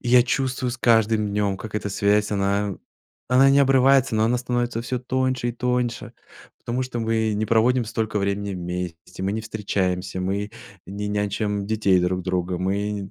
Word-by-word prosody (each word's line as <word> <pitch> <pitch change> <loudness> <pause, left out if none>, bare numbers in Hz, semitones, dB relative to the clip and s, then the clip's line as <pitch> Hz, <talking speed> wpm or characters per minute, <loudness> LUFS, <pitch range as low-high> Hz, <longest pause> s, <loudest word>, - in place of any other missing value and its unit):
я 125 0 +5
чувствую 130 0 -1
с 120 - -5
каждым 110 -2 +3
днем 100 -1 0
как 105 +1 -9
эта 105 - -2
связь, 100 +1 +1
она 100 0 0 0.5
она 130 +2 +5
не 140 - +5
обрывается, 135 -2 +4
но 110 - +2
она 125 +2 +2
становится 120 -1 -1
всё 125 +1 -3
тоньше 130 -1 -1
и - - -2
тоньше, 125 0 -2 0.5
потому 125 +2 -2
что 120 -2 -4
мы 110 -1 0
не 110 +1 0
проводим 115 +3 +3
столько 110 -2 -2
времени 100 0 -2
вместе, 90 0 -6
мы 100 - 0
не 110 - -2
встречаемся, 95 -4 -2
мы 100 +3 -2 0.4
не 100 +2 -4
нянчим 105 0 -1
детей 105 -4 +2
друг 90 +1 0
друга. 90 0 -1
Мы 100 +1 -2
105 Hz, 170 wpm, -23 LUFS, 100-120 Hz, 0.5 s, я